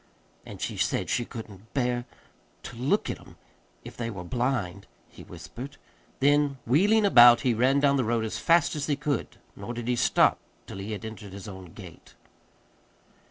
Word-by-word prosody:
"And - - -9
she - - -4
said - - -1
she 120 - 0
couldn't 110 -3 -11
bear 125 -2 0 0.6
to 125 - -9
look 135 - 0
at - - -7
'em - - -17 0.5
if - - -10
they 115 -1 -4
were 100 -5 -7
blind," 100 -3 -2 0.2
he - - -15
whispered. 140 +4 -10 0.4
Then, 145 0 +3
wheeling 205 - +3
about, 120 -10 +8
he 125 -3 +2
ran 130 +5 +3
down 140 -1 +3
the 130 - +1
road 115 0 0
as 110 - -4
fast 170 -2 +3
as 145 -1 -3
he 145 - +1
could. 145 -2 -3 0.2
Nor 120 - -7
did 120 0 -5
he 125 - +1
stop - - +3 0.3
till 95 - -9
he 100 +3 -5
had 105 +2 -6
entered 105 -3 -9
his 100 0 -9
own 95 -4 -10
gate. 90 -6 -13
120 Hz, 180 wpm, -27 LUFS, 110-140 Hz, 0.6 s, about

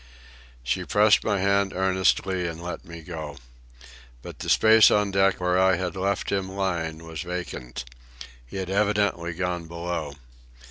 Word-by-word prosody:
She 60 - -1
pressed 105 0 +4
my 105 -3 0
hand 100 0 +1
earnestly 95 -1 +1
and 80 -1 -6
let 85 -1 -6
me 85 -1 -10
go. 75 -4 -7 0.9
But - - -10
the - - -5
space 110 0 +7
on 105 -1 +2
deck 95 0 +2
where 90 0 +1
I 95 0 +4
had 90 +2 -3
left 95 +1 -1
him 95 -1 -1
lying 85 -4 -3
was 80 -2 -6
vacant. 85 -9 -6 0.6
He - - -9
had 95 -1 -4
evidently 100 -4 +1
gone 90 -2 -3
below. 85 -3 -4
90 Hz, 150 wpm, -25 LUFS, 85-95 Hz, 0.9 s, space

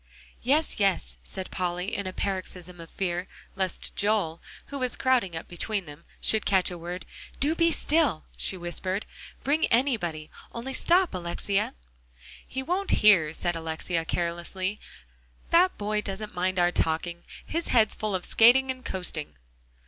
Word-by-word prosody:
"Yes, 295 +3 +2
yes," 180 - +1
said 185 - -6
Polly 180 +2 -1
in 200 -2 -2
a - - -2
paroxysm 185 -2 -4
of 165 - -11
fear 180 -1 -2 0.3
lest 190 -2 -3
Joel, 200 -6 +1 0.3
who 280 - -3
was 255 -1 -1
crowding 245 -10 +2
up 160 - -5
between 195 +3 -2
them, 150 +1 -12
should 220 -1 +2
catch 190 -2 +3
a 175 - -5
word; 175 +2 -6 0.3
"do 295 +4 +3
be 335 0 +3
still," 295 - +2
she 190 - 0
whispered. 185 +3 -2 0.4
"Bring 295 +4 +2
anybody; 205 - +1 0.2
only 250 +3 -4
stop, 355 - +3
Alexia." 185 - -1 0.7
"He 265 +1 -3
won't 365 +7 -1 0.2
hear," 170 -8 +7
said 175 +2 -2
Alexia 165 +1 -2
carelessly; 175 +4 -2 0.7
"that 360 +2 +5
boy 210 +1 0
doesn't 210 +1 -5
mind 185 +1 0
our 175 0 +4
talking; 170 +1 -1 0.2
his 335 +1 -2
head's 220 -3 +4
full 215 -2 -2
of 180 - -2
skating 260 +4 +6
and 255 0 -9
coasting." 165 - -3
190 Hz, 150 wpm, -27 LUFS, 175-240 Hz, 0.7 s, hear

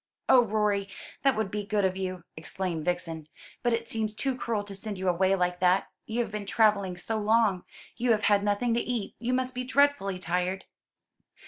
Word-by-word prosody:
"Oh, 250 -2 +7
Rorie, 210 -2 0 0.3
that 270 -2 +3
would 215 -3 -1
be 210 0 -2
good 205 -1 +1
of 185 0 0
you!" 185 -2 -4
exclaimed 165 0 -4
Vixen. 165 -3 -2 0.3
"But 240 - +1
it 230 0 -1
seems 220 -1 -2
too 265 +4 -1
cruel 230 -4 -2
to 205 -1 -8
send 200 +1 -5
you 190 0 -3
away 190 +2 +3
like 180 -1 0
that; 180 +1 +3 0.2
you 230 +2 0
have 230 - -4
been 210 -1 -5
travelling 200 -4 +2
so 220 +5 -2
long. 215 -3 +2 0.3
You 245 +1 0
have 220 -2 +3
had 200 -1 +4
nothing 205 +4 +1
to 235 - +2
eat. 240 -5 -3
You 245 +2 0
must 255 0 -1
be 255 0 -3
dreadfully 255 -7 +2
tired." 180 +2 -2
205 Hz, 200 wpm, -28 LUFS, 185-230 Hz, 0.3 s, Oh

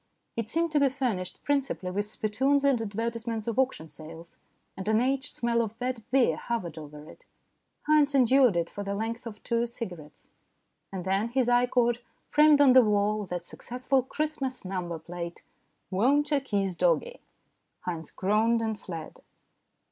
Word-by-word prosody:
It 230 -2 -3
seemed 330 0 0
to 300 - +3
be 280 -1 +4
furnished 240 -9 -3
principally 275 -10 -1
with 205 +2 -1
spittoons 260 +6 +1
and 275 -4 +3
advertisements 225 +1 -3
of 230 +1 -1
auction 255 -11 0
sales, 160 +2 -12 0.4
and 190 +1 -6
an 220 0 +3
aged 265 +2 -1
smell 235 0 +1
of 225 -1 -4
bad 250 -1 -3
beer 260 -1 +3
hovered 185 -9 -3
over 150 0 -10
it. - - -15 0.6
Haynes 295 -2 +4
endured 255 -5 +5
it 170 -1 0
for 205 - -6
the 200 0 -3
length 230 +3 -4
of 215 -2 -10
two 235 0 0
cigarettes, 175 -11 -9 0.6
and 190 -2 -5
then 195 +3 +1
his 255 0 +1
eye 245 0 +4
caught, 240 -1 +2 0.3
framed 300 -1 +6
on 270 -3 +7
the 260 - +9
wall, 210 -1 +1
that 175 -1 -4
successful 255 +6 -1
Christmas 270 -3 -3
number 180 -3 -3
plate, 170 +1 -7 0.5
"Won't 280 +10 +2
'Oo 290 - +4
Kiss 200 -8 -1
Doggie?" - - +1 0.6
Haynes 165 -3 -4
groaned 220 +4 +2
and 220 -2 -2
fled. 165 -4 -8
230 Hz, 165 wpm, -28 LUFS, 190-265 Hz, 0.6 s, the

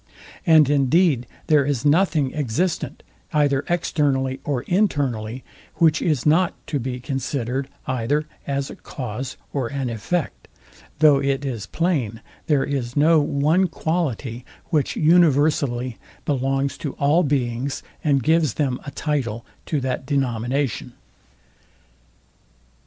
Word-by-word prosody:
And 155 -3 +7
indeed 145 -1 +3 0.2
there 150 -2 +4
is 140 -2 -1
nothing 150 -3 +3
existent, 155 +5 -2 0.3
either 145 -2 +2
externally 140 -6 0
or 135 -4 -2
internally, 130 - 0 0.3
which 160 -3 +3
is 150 -7 0
not 170 +4 +3
to 145 - -2
be 125 0 -4
considered 130 0 -2 0.2
either 130 +4 0 0.2
as 140 -1 -2
a - - -8
cause 125 0 -6 0.2
or 135 -4 -1
an 135 -2 -3
effect; 150 +9 -3 0.5
though 150 -2 +6
it 140 0 0
is 115 -7 -4
plain 140 - -1 0.3
there 145 -3 +3
is 135 -2 -3
no 160 +2 +5
one 150 +6 +2
quality, 145 -8 -2 0.3
which 150 -4 +1
universally 145 -7 +3 0.3
belongs 135 0 0
to 145 - -4
all 145 +5 +3
beings, 135 -3 -1 0.2
and 140 -4 +2
gives 160 -3 +2
them 135 -4 0
a - - -6
title 130 -6 -2 0.2
to 150 - 0
that 130 0 -3
denomination. 130 -1 -1
140 Hz, 120 wpm, -22 LUFS, 130-155 Hz, 0.5 s, And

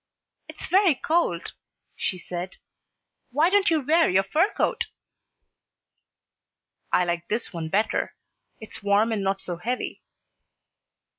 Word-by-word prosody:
"It's - - -9
very 375 -4 +4
cold," 310 - 0 0.4
she 185 - -2
said. 180 +1 -6 0.7
"Why 305 +7 +3
don't 405 0 +4
you 320 -2 +2
wear 320 +5 +3
your 190 +1 +3
fur 315 - +2
coat?" - - +1 2.1
"I 180 - +3
like 175 0 -2
this 220 -1 -3
one 165 -2 -4
better. 210 +6 0 0.4
It's 220 - -11
warm 205 +3 +3
and 215 -2 0
not 195 0 -1
so 175 -1 -4
heavy." 245 +8 -3
215 Hz, 125 wpm, -25 LUFS, -, 2.1 s, very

